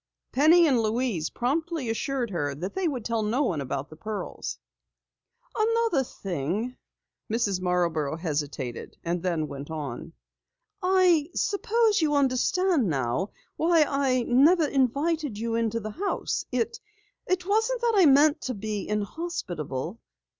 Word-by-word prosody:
Penny 325 +5 +6
and 265 -6 +3
Louise 220 -7 0
promptly 315 +2 -1
assured 240 +1 -2
her 145 -6 -2
that 180 +7 -5
they 380 -2 0
would 255 -8 -3
tell 230 -1 0
no 225 +7 +1
one 170 - -1
about 140 +1 -4
the - - -10
pearls. 210 +6 -5 1.0
"Another 450 -9 +2
thing 195 - -3 0.3
" - - -18
Mrs. 205 -5 0
Marborough 170 -5 0
hesitated 145 -7 -4
and 170 +1 -1
then 165 -4 -1
went 140 +1 -8
on. 150 0 -6 0.7
"I 360 -4 +4
suppose 435 0 +2
you 300 -2 +2
understand 280 - +2
now 135 - -1 0.3
why 330 -1 +4
I 265 -3 +1
never 300 +8 +5
invited 285 0 0
you 230 +1 -2
into 230 0 0
the 215 -1 -5
house. 390 - -2
It 235 -2 -1 0.7
wasn't 445 +5 +1
that 475 -1 +2
I 375 -5 +6
meant 290 +3 +5
to 255 - -3
be 210 -1 -4
inhospitable." 205 - -3
235 Hz, 135 wpm, -27 LUFS, -, 1.0 s, Penny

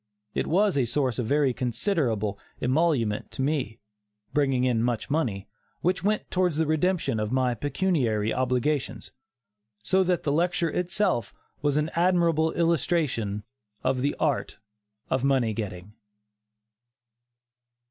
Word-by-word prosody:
It - - -1
was 195 -1 +2
a 130 - +2
source 130 +1 -1
of 120 - -1
very 140 -1 +2
considerable 120 - -1 0.2
emolument 130 -6 +1
to 135 - -2
me, 135 -7 -1 0.6
bringing 135 -3 +2
in 125 -3 +2
much 120 +2 -1
money, 115 -11 -1 0.3
which 180 0 0
went 210 +1 0
towards 180 -4 +1
the 160 - +2
redemption 155 -5 +1
of 105 0 -2
my 130 -1 +2
pecuniary 130 - 0
obligations, 130 +3 -1 0.7
so 190 - +3
that 180 -2 0
the 145 - 0
lecture 170 +1 +1
itself 180 - 0 0.3
was 145 0 +1
an 150 +2 0
admirable 170 -2 +3
illustration 150 - 0 0.4
of 130 0 +1
"The 140 +2 0
Art - - 0 0.5
of 130 0 +1
Money 130 -5 +2
Getting." 100 -2 -6
140 Hz, 125 wpm, -26 LUFS, 120-170 Hz, 0.7 s, so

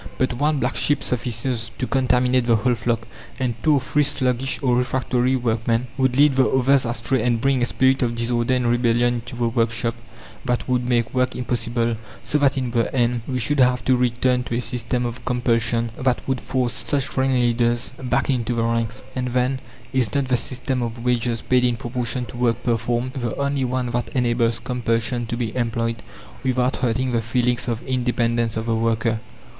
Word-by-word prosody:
But 130 -1 +1
one 150 +4 +1
black - - -1
sheep 145 -1 +1
suffices 120 -1 -1
to 130 - -1
contaminate 125 -1 +2
the 115 - +5
whole 120 +3 +2
flock, 115 0 -2 0.3
and 125 -2 0
two 155 -2 +4
or - - +3
three 150 +3 +1
sluggish 135 -2 0
or 125 -2 +3
refractory 125 0 +1
workmen 115 -1 0
would 130 -1 +1
lead 145 -2 +5
the 130 - +4
others 130 +1 +3
astray 120 +2 -1
and 120 -1 +1
bring 135 +1 +1
a 120 - +2
spirit 130 +2 +2
of 120 -2 0
disorder 120 +1 +1
and 125 -1 0
rebellion 120 0 +2
into 120 0 -6
the 120 -1 0
workshop 115 0 0 0.5
that 125 -2 -1
would 125 -1 0
make 120 -2 +1
work 125 0 +1
impossible; 120 -1 -1 0.3
so 150 - 0
that 140 -1 +3
in 130 -2 -1
the 115 -1 0
end 120 -1 +1
we 130 - -2
should 130 +5 0
have 125 -1 +3
to 130 - +4
return 125 0 +1
to 120 - -3
a - - 0
system 120 +1 -1
of 120 +1 -5
compulsion 115 -1 0
that 125 -1 0
would 130 -1 -1
force 125 -3 -2
such 140 -3 -1
ringleaders 120 -2 +1
back 125 - 0
into 120 -3 0
the 115 - +1
ranks. 115 0 -1
And 125 -1 -1
then, 125 +1 0 0.3
Is 125 -5 +1
not 140 -2 0
the 130 - +3
system 130 +1 -2
of 115 0 -4
wages, 120 -2 0
paid 125 -1 +3
in 120 -1 +2
proportion 125 0 -2
to 120 - -10
work 120 -1 0
performed, 120 +2 -1
the 120 -4 -3
only 140 -1 0
one 125 -1 -1
that 120 0 -2
enables 120 -2 +2
compulsion 120 0 -1
to 120 - -3
be 115 -2 -3
employed, 115 -1 -1 0.4
without 130 0 +1
hurting 125 +1 0
the 115 -1 +1
feelings 120 +2 0
of 120 0 -2
independence 120 -3 0
of 110 - -3
the 115 - 0
worker? 115 0 0
125 Hz, 195 wpm, -22 LUFS, 115-130 Hz, 0.5 s, the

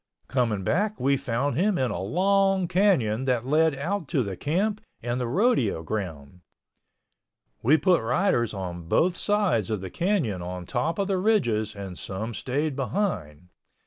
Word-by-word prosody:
Coming 115 -7 0
back 205 - 0
we 140 +2 +3
found 135 0 -1
him 195 +2 +2
in 130 -2 0
a 85 - -3
long 190 - +2
canyon 170 - +2
that 125 -2 0
led 155 +2 +3
out 165 +4 -3
to 135 -1 +1
the 100 -3 -4
camp 195 - -1 0.2
and 120 +1 -2
the 125 - -1
rodeo 130 - +1
ground. 85 -4 -5 1.2
We 145 +7 +5
put 180 +1 +3
riders 120 - +1
on 90 -4 -6
both 180 - +2
sides 200 - +1
of 110 -2 -1
the 95 -2 -6
canyon 170 - 0
on 90 0 -6
top 135 - -1
of 200 - 0
the 195 -2 0
ridges 120 - +1
and 95 -3 -7
some 110 +5 -5
stayed 140 +5 -2
behind. 100 - -2
130 Hz, 160 wpm, -26 LUFS, -, 1.2 s, We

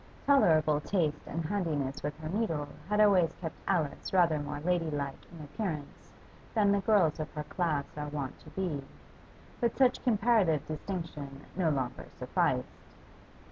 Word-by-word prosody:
Tolerable 155 - +4
taste 155 -5 -1
and 165 +1 -3
handiness 155 -8 -1
with 145 +1 -3
her 155 0 -5
needle 165 -7 -1 0.2
had 210 0 +2
always 195 -6 +5
kept 160 -3 -6
Alice 165 -7 0
rather 170 -5 +4
more 145 0 -4
ladylike 155 -4 -2
in 165 -3 -9
appearance 150 -1 -5 0.4
than 205 -2 +4
the 200 - +3
girls 190 -9 +3
of 155 0 -3
her 150 - -3
class 150 -3 -1
are 150 0 -4
wont 145 -3 -4
to 155 - -14
be, 155 -4 -2 0.8
but 235 -2 0
such 255 -2 +3
comparative 210 - +3
distinction 155 -4 -5
no 175 -3 +2
longer 130 -4 -2
sufficed. - - +1
160 Hz, 145 wpm, -31 LUFS, 150-195 Hz, 0.8 s, always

